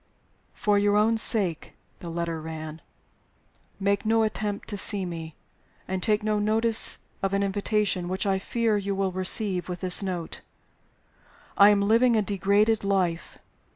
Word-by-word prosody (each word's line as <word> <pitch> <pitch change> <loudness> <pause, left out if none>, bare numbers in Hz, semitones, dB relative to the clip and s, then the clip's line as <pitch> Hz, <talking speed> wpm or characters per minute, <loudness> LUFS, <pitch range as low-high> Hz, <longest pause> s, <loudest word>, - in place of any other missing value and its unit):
"For 210 -3 +1
your 205 0 +2
own 220 +2 +2
sake" 190 -8 0 0.3
(the 170 - -8
letter 165 -1 -4
ran) 155 0 -8 1.0
"make 200 0 0
no 225 0 +2
attempt 210 -1 -3
to 210 - -4
see 195 -1 +4
me, 165 -2 -7 0.5
and 190 0 -3
take 210 +2 +1
no 215 -1 0
notice 220 +2 +3 0.2
of 195 0 -1
an 200 - 0
invitation 200 -2 -1
which 190 +3 -2
I 195 -1 0
fear 225 +1 -1
you 200 0 -3
will 195 -1 -1
receive 185 0 0
with 180 -1 -6
this 185 0 +3
note. 180 -4 -5 1.1
I 200 +1 +7
am 205 -1 +3
living 230 +4 +3
a 215 - +2
degraded 205 +3 +1
life. 185 -4 -2
200 Hz, 155 wpm, -25 LUFS, 185-210 Hz, 1.1 s, I